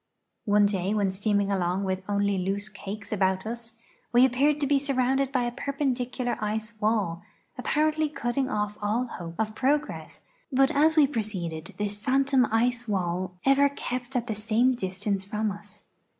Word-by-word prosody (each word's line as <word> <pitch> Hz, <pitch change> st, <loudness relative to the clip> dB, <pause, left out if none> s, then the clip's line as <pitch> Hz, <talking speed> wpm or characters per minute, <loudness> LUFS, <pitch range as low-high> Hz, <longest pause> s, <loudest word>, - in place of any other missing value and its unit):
One 205 Hz, -1 st, +4 dB
day 200 Hz, 0 st, 0 dB
when 200 Hz, -2 st, +1 dB
steaming 200 Hz, +1 st, 0 dB
along 185 Hz, 0 st, 0 dB
with 190 Hz, -1 st, -1 dB
'only 200 Hz, -1 st, +1 dB
loose 200 Hz, +3 st, -2 dB
cakes 205 Hz, 0 st, -8 dB
about 190 Hz, -2 st, +1 dB
us 230 Hz, 0 st, -5 dB, 0.4 s
we 245 Hz, +2 st, +6 dB
appeared 280 Hz, +4 st, +2 dB
to -, -, +3 dB
be 280 Hz, 0 st, +3 dB
surrounded 270 Hz, -1 st, +1 dB
by 255 Hz, -2 st, +1 dB
a 240 Hz, -, -1 dB
perpendicular 255 Hz, -2 st, -2 dB
ice 215 Hz, +2 st, -2 dB
wall, 205 Hz, -6 st, +1 dB, 0.3 s
apparently 310 Hz, 0 st, +1 dB
cutting 270 Hz, -1 st, -1 dB
off 210 Hz, -2 st, -2 dB
all 215 Hz, +5 st, 0 dB
hope 170 Hz, -8 st, -8 dB
of 215 Hz, 0 st, -1 dB
progress, 285 Hz, +6 st, -1 dB, 0.3 s
but 270 Hz, +2 st, +4 dB
as 315 Hz, +1 st, +4 dB
Ave 310 Hz, -2 st, +6 dB
proceeded 185 Hz, -, -4 dB
this 205 Hz, 0 st, -1 dB
phantom 265 Hz, +3 st, +2 dB
ice 240 Hz, +2 st, +1 dB
wall 180 Hz, -2 st, -2 dB
ever 275 Hz, +1 st, +5 dB
kept 250 Hz, -1 st, -5 dB
at 240 Hz, -2 st, +1 dB
the 225 Hz, -, -2 dB
same 220 Hz, +4 st, +2 dB
distance 195 Hz, -3 st, -2 dB
from 210 Hz, +2 st, -2 dB
us. 205 Hz, +1 st, -10 dB
220 Hz, 165 wpm, -27 LUFS, 200-260 Hz, 0.4 s, we